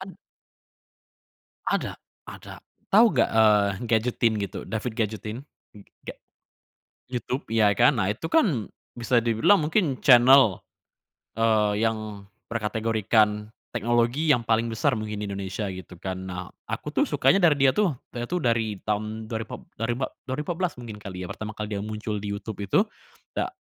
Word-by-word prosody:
Ad 190 0 -9 1.5
Ada - - -1 0.3
ada. - - -10 0.3
Tahu 220 +4 +7
enggak, - - +3
eee, 105 -2 +5 0.2
GadgetIn 115 0 +2
gitu? 100 +1 -5
David 110 +2 -3
GadgetIn 110 +1 -2 0.4
enggak. 100 -1 -12 0.9
YouTube, 125 +1 -4
ya 110 -2 +3
kan, 125 +6 +4
nah, 105 -1 +1
itu 160 +9 -6
kan 160 - +2 0.2
bisa 120 +1 -1
dibilang 115 - +4
mungkin 155 -4 +1
channel, 125 - +7 0.8
eee, 110 -1 +2
yang 110 -2 -2 0.2
berkategorikan 110 -1 0 0.2
teknologi 120 +6 +1
yang 120 -4 +2
paling 115 +1 +2
besar 125 +3 +1
mungkin 105 -1 -4
di 105 - -3
Indonesia, 100 +1 -4
gitu 95 -2 -8
kan. 95 -1 -5
Nah, 90 -1 -6 0.2
aku - - -4
tuh - - +4
sukanya 195 0 +2
dari 150 -5 +5
dia 130 - +3
tuh 205 -5 +3 0.2
dia 120 - -3
tuh 180 - 0
dari 115 - 0
tahun 110 +1 -2
dua 110 0 -3
ripat - - -8 0.2
dua 115 +1 -3
ripat 130 +2 -2
dua 130 -1 -4
ribu - - -2
empat 175 - -1
belas 180 - 0
mungkin 115 -3 -8
kali 95 -3 -6
ya - - -7
pertama 105 +3 -6
kali 105 -1 -5
dia 100 - -3
muncul 105 0 -4
di 100 - -3
YouTube 100 0 -5
itu, 100 - +2 0.6
da - - -1
110 Hz, 160 wpm, -25 LUFS, 105-120 Hz, 1.5 s, Tahu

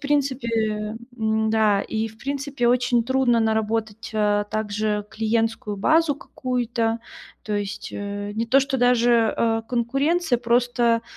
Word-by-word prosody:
принципе 230 -7 -1 0.2
м-да. 220 -2 +2
И, 220 0 -2
в 220 0 -17
принципе, 275 -2 -2
очень 245 -1 +2
трудно 255 -2 +2
наработать, 220 0 -1
э, 205 -1 +2
также 210 -1 -1
клиентскую 225 -1 -1
базу 315 +8 +3
какую-то. 240 -4 -2 0.4
То 215 - -5
есть, 205 -1 -4
э, 205 0 -5
не 230 +1 -1
то 270 +4 +5
что 265 -1 -1
даже, 240 -2 +3
э, 225 -1 +1
конкуренция, 275 +5 +1
просто 235 -1 +2
230 Hz, 125 wpm, -23 LUFS, 215-250 Hz, 0.4 s, то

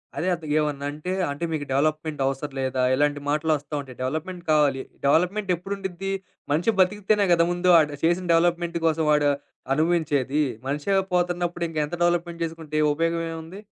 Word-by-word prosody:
అదే 180 - -2
అద్ 170 -2 -5
ఏమన్నా 145 -2 -1
అంటే, 155 +5 -5 0.2
అంటే 145 +4 -3
మీకు 145 -2 -2
డెవలపప్‌మెంట్ 155 +1 0
అవసరం 135 +1 -2
లేదా? 130 -1 -1
ఇలాంటి 145 +1 +1
మాటలొస్తా 150 -1 0
ఉంటాయి. 130 -3 -9
డెవలపప్‌మెంట్ 160 +7 -3
కావాలి. 145 -3 +3 0.2
డెవలపప్‌మెంట్ 180 +7 +2
ఎప్పుడుండిద్ది? 195 +1 -5 0.4
మనిషి 165 +9 +2
బతికితేనే 205 +2 +3
కదా! 170 0 +4
ముందు 175 +1 +1
ఆడు 150 -2 0
చేసిన 175 +2 +2
డెవలపప్‌మెంట్ 170 0 +1
కోసం 160 0 +1
వాడు 145 -1 +4 0.4
అనుభవించేది. 150 -3 +1 0.2
మనిషే 150 +8 0 0.2
పోతున్నప్పుడు 175 -1 0
ఇంక 160 - -8
ఎంత 160 - -5
డెవలపప్‌మెంట్ 170 -1 0
చేసుకుంటే, 160 -2 -7
ఏ - - +4
ఉపయోగం 165 +2 0
ఏముంది? 165 +5 -8
160 Hz, 155 wpm, -24 LUFS, 145-175 Hz, 0.4 s, కదా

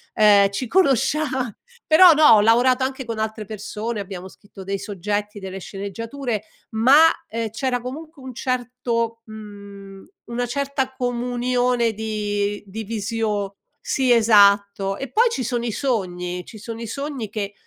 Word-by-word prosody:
uhm, 205 -2 +6
ci 240 +5 -3
conoscia 305 - +2 0.6
però 340 +3 +8
no, 305 0 +4
ho 210 - +6
lavorato 245 +4 +4
anche 265 -1 -3
con 230 -1 -5
altre 220 0 -3
persone, 215 +1 -5
abbiamo 190 -1 -8
scritto 195 0 -14
dei 195 +1 -3
soggetti, 205 +1 -4
delle 190 0 -7
sceneggiature, 220 +5 -5 0.3
ma, 265 +9 +6 0.2
ehm, 225 0 -3
c'era 245 +3 -2
comunque 300 +4 -8
un 260 -1 -8
certo 240 -2 -2
mhmm, 200 -2 -11 0.2
una 240 +1 -3
certa 270 +1 -2
comunione 245 -1 0
di 205 -1 -2
di 220 +3 -6
visio 210 -2 -2 0.3
sì, 260 -2 +2
esatto. 200 -3 +4
E 270 +2 -7
poi 470 +2 +4
ci 265 - -3
sono 240 0 -2
i 225 - -2
sogni, 180 -8 -2
ci 220 - -12
sono 230 +1 -7
i 230 - -6
sogni 275 -2 -4
che 205 -1 -4
225 Hz, 145 wpm, -22 LUFS, 205-250 Hz, 0.6 s, però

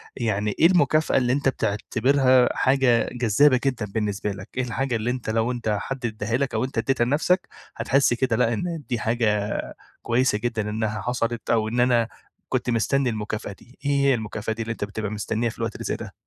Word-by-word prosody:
يعني 105 -3 -1
إيه - - +5
المكافأة 155 -3 +3
اللي 125 -1 +2
أنت 140 0 +2
بتعتبرها 130 +3 +2
حاجة 130 -3 +3
جذّابة 125 +3 +4
جدًا 125 -5 0
بالنسبة 105 0 -2
لك؟ 95 -1 -8
إيه 130 - +1
الحاجة 125 +1 -2
اللي 115 +2 -1
أنت 125 -3 -4
لو 115 +2 +1
أنت 115 -4 -1
حد 135 -2 -5
إداّها 110 +1 -1
لك، 140 0 -2
أو 110 +1 0
أنت 130 -1 -5
إدّيتها 120 +1 +1
لنفسك، 160 +8 +1 0.3
هتحس 135 -2 +2
كده 125 -1 0
لأ، 115 +1 +2
إن 165 +5 -3
دي 120 -2 -1
حاجة 105 -2 0 0.4
كويسة 120 -2 +2
جدًا 110 -2 -2
إنها 105 -1 -2
حصلت، 120 0 -2
أو 110 -2 +2
إن 120 +3 -2
أنا 120 -2 +3 0.4
كنت 125 -1 -1
مستنّي 125 +3 +1
المكافأة 110 -2 -4
دي؟ 120 +6 -20
إيه 145 - +2
هي 140 -1 +3
المكافأة 110 -1 -3
دي 115 - -6
اللي 115 0 -3
أنت 110 - -4
بتبقى 105 0 -4
مستنّيها 110 +3 -1
في - - -11
الوقت 115 -1 -3
اللي - - -6
زي - - -1
ده؟ - - -8
120 Hz, 200 wpm, -24 LUFS, 110-130 Hz, 0.4 s, إيه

